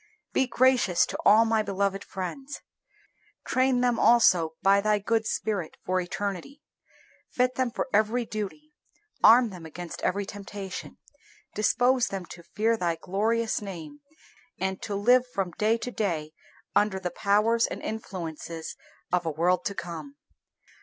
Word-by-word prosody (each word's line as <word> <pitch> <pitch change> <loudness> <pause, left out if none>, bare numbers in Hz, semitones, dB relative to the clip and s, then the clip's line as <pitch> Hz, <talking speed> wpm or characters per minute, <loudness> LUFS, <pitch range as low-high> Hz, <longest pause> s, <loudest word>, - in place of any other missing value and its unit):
Be 265 - +2
gracious 245 -8 +3
to - - -5
all 220 +2 +7
my 225 -1 +2
beloved 195 -1 -1
friends. 265 +10 -6 0.8
Train 255 -1 +2
them 245 -1 +2
also, 180 -9 +4
by 200 +1 +5
Thy 210 0 +2
good 220 +2 0
Spirit, 200 -7 -2
for 185 0 +1
eternity. 200 - -5 0.7
Fit 250 0 +1
them 255 -1 0
for 235 - -3
every 220 +4 +2
duty. 220 +9 -6 0.5
Arm 235 0 +7
them 180 -3 -10
against 165 +2 -8
every 200 +2 0
temptation. 200 -1 -7 0.6
Dispose 245 +4 +2
them 195 -2 -5
to 175 - -10
fear 220 +6 0
Thy 170 -4 0
glorious 220 +7 -1
name, 195 - -8 0.6
and 190 0 -2
to 205 - -4
live 245 +5 +4
from 190 -3 -1
day 220 +2 +3
to 245 - -5
day 165 -9 -2 0.4
under 205 -2 +2
the 180 -2 -3
powers 210 +5 +2
and - - -6
influences 170 -6 -6 0.4
of 175 -2 +1
a - - +2
world 170 +4 +1
to 200 - -2
come. 160 -6 -7
205 Hz, 145 wpm, -27 LUFS, 180-230 Hz, 0.8 s, all